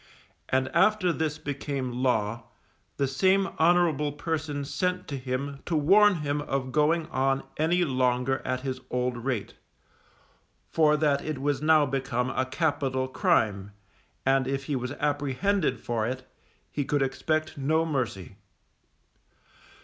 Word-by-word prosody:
And 130 0 +1
after 185 0 +3
this 155 -2 -2
became 140 -3 -4
law, 115 -3 0 0.5
the 140 - +1
same 190 +9 +3
honourable 160 -3 +3
person 145 -1 -3
sent 180 +4 -2
to 140 - -3
him 135 +2 -4
to 170 - 0
warn 195 +7 +5
him 145 +1 0
of 135 -2 -3
going 155 +3 +2
on 135 +1 +1
any 175 +3 +2
longer 130 -1 +1
at 130 0 -2
his 130 -1 -4
old 125 0 -1
rate, 120 -3 -3 1.1
for 150 -2 +3
that 145 -2 +2
it 155 -4 -4
was 140 0 0
now 155 -1 +5
become 130 -2 -1
a 130 - -1
capital 135 -3 0
crime, 110 - +1 0.5
and 135 -1 +3
if 135 0 -2
he 145 0 -2
was 125 0 -3
apprehended 145 - 0
for 115 -2 -2
it, 130 +1 -5 0.4
he 145 - -1
could 145 0 +1
expect 155 +4 -1
no 155 +4 +1
mercy. 120 - -3
140 Hz, 135 wpm, -27 LUFS, 130-155 Hz, 1.1 s, warn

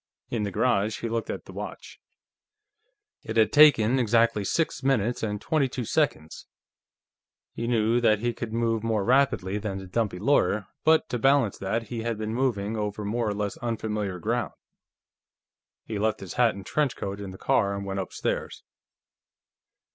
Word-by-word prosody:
In 115 - -1
the 105 - -1
garage, 105 0 +1
he 115 - -2
looked 115 -1 -2
at - - -5
the - - -11
watch. - - -8 1.2
It 110 - -5
had 110 -1 +4
taken 135 -5 +6
exactly 115 -2 +2
six 160 - -1
minutes 125 -4 +1
and 105 -2 -2
twenty 140 0 +1
two 125 -1 -4
seconds. 115 - -1 1.1
He 115 - -4
knew 115 0 +2
that 110 -2 +4
he 120 +3 -1
could 115 -1 -6
move 115 -1 0
more 110 -3 0
rapidly 120 -6 +2
than 100 -2 -4
the 95 - -7
dumpy 100 0 -1
lawyer, 105 -3 +2 0.2
but 160 0 +4
to 125 - -2
balance 135 -5 +3
that, 110 +4 -2
he 120 -2 -4
had 115 -1 -2
been 110 0 -3
moving 115 -4 -1
over 105 -1 -3
more 115 +2 -1
or 105 - -2
less 105 -1 -3
unfamiliar 105 -5 -3
ground. 85 - -2 1.3
He 105 -2 -4
left 110 +1 0
his 95 -3 -7
hat 120 -4 +3
and 100 -1 -9
trench 145 0 0
coat 100 0 -5
in 100 - -6
the 95 - -9
car 100 +1 +1
and 100 0 -5
went 100 0 -3
upstairs. 95 - -3
110 Hz, 170 wpm, -26 LUFS, 100-120 Hz, 1.3 s, taken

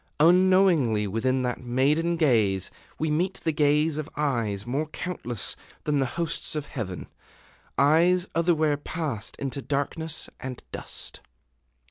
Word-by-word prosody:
Unknowingly 175 - +5
within 130 +6 0
that 125 -1 -2
maiden 140 +7 +2
gaze 110 - +2 0.3
we 155 -1 0
meet 180 +5 +1
the 160 - +1
gaze 150 +1 +2
of 155 +1 -5
eyes 115 -9 0
more 140 +6 -1
countless 135 - -4 0.3
than 150 -2 +1
the 135 - +1
hosts 170 -1 -1
of 150 -2 -2
heaven, 105 -10 -5 0.7
eyes 170 +7 +4
otherwhere 160 -3 +2
passed 145 -7 -4
into 140 0 -4
darkness 150 +3 -2
and 130 -1 -6
dust. - - -5
145 Hz, 125 wpm, -26 LUFS, 125-165 Hz, 0.7 s, Unknowingly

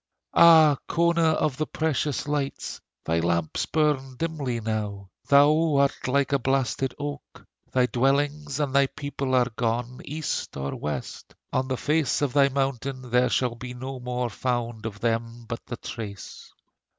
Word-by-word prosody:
Ah, 160 -4 +7
Cona 170 -1 +3
of 150 -4 0
the 155 - -1
precious 150 -2 -1
lights, 145 -2 -3 0.2
Thy 80 +1 +1
lamps 85 -1 0
burn 145 -4 0
dimly 140 -5 -2
now: 105 -3 -4 0.2
Thou 150 +2 +5
art 140 -1 +1
like 140 +2 +1
a 140 - +3
blasted 135 0 0
oak: 145 0 -7 0.3
Thy 125 -1 +3
dwellings 140 +3 0
and 145 -3 -1
thy 140 0 +5
people 140 -2 -3
are 125 -1 +3
gone 120 +1 -2
East 155 0 -4
or 70 0 -3
west; 75 -1 -6 0.2
on 130 - +1
the 130 -1 -1
face 150 0 +1
of 140 - 0
thy 140 -1 +5
mountain, 135 -2 -2
There 125 +1 +4
shall 125 -2 +1
be 125 +1 -8
no 130 +1 -6
more 125 -1 -2
found 120 -1 -2
of 105 -2 -9
them 115 0 -2
but 115 0 -5
the 120 - -5
trace! 105 -5 -8
130 Hz, 155 wpm, -26 LUFS, 120-145 Hz, 0.3 s, Ah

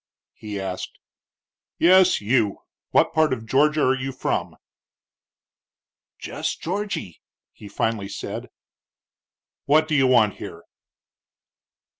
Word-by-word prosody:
he 105 -2 -7
asked. 95 -1 -5 0.8
"Yes, 185 -2 +5
you. 105 -2 0 0.3
What - - +3
part 155 0 +3
of 115 -3 -3
Georgia 150 +6 +2
are 130 - +4
you 135 +1 -4
from?" 130 - -3 1.6
"Jess - - -4
Georgy," 185 - -4 0.3
he 105 - -12
finally 100 0 -2
said. - - -6 1.2
"What 155 +2 +4
do 155 - -2
you 135 -3 +4
want 115 -5 +3
here?" - - -9
130 Hz, 105 wpm, -23 LUFS, 105-155 Hz, 1.6 s, Yes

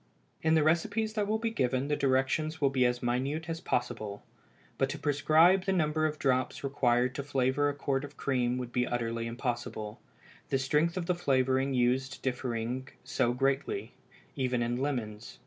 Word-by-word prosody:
In 160 0 +3
the 155 - +4
recipes 210 +7 +1
that 210 -2 0
will 215 +1 +1
be 225 0 -2
given 130 - 0
the 150 - +1
directions 140 +4 +1
will 140 -2 +3
be 130 -2 +3
as 125 0 -2
minute 135 +7 -1
as 165 0 -4
possible; 110 - -2 0.6
but 135 - +2
to 150 - -4
prescribe 155 +6 +4
the 195 - +1
number 155 -3 +2
of 155 0 -4
drops 130 -2 0
required 125 -2 +2
to 140 - -4
flavor 135 +1 +1
a 145 - -3
quart 140 -1 -1
of 145 0 -9
cream 125 -2 0
would 125 -1 -5
be 125 0 +1
utterly 115 -1 -2
impossible, 115 -3 -4 0.5
the 135 - +2
strength 150 +6 +1
of 180 - -2
the 180 - +2
flavoring 135 -4 +1
used 130 +2 0
differing 125 0 -2 0.2
so 120 - +1
greatly, 135 - -1 0.4
even 125 -3 0
in 120 +1 -1
lemons. 120 -5 -3
135 Hz, 175 wpm, -30 LUFS, 125-155 Hz, 0.6 s, the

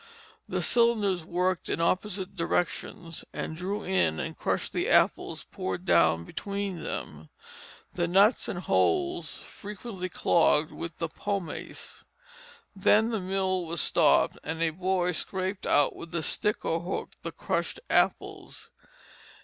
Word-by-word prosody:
The - - -1
cylinders 215 -7 +2
worked 180 +2 -1
in - - -1
opposite 190 +3 -1
directions 170 -1 -2
and 160 - -4
drew 195 +5 -3
in 180 - +1
and - - -4
crushed - - -2
the - - 0
apples - - +2
poured 95 -1 -4
down 85 -1 +4
between 200 - -4
them. 75 +1 -4 0.6
The 175 -1 0
nuts 200 +6 +4
and - - -3
holes 360 -2 +1
frequently 200 -2 -7
clogged 160 -3 +3
with 165 0 -7
the 165 - -2
pomace. 195 +1 -5 0.7
Then 215 +4 +4
the 220 - 0
mill 185 -1 0
was 170 0 -3
stopped - - +3
and 160 +1 -2
a 165 - +2
boy 180 +1 0
scraped 190 +3 -2
out 145 - +4
with 170 0 -8
a 165 - -1
stick 210 +7 0
or 165 - +1
hook 175 +3 -4
the - - -5
crushed - - -2
apples. - - 0
185 Hz, 135 wpm, -28 LUFS, 165-200 Hz, 0.7 s, down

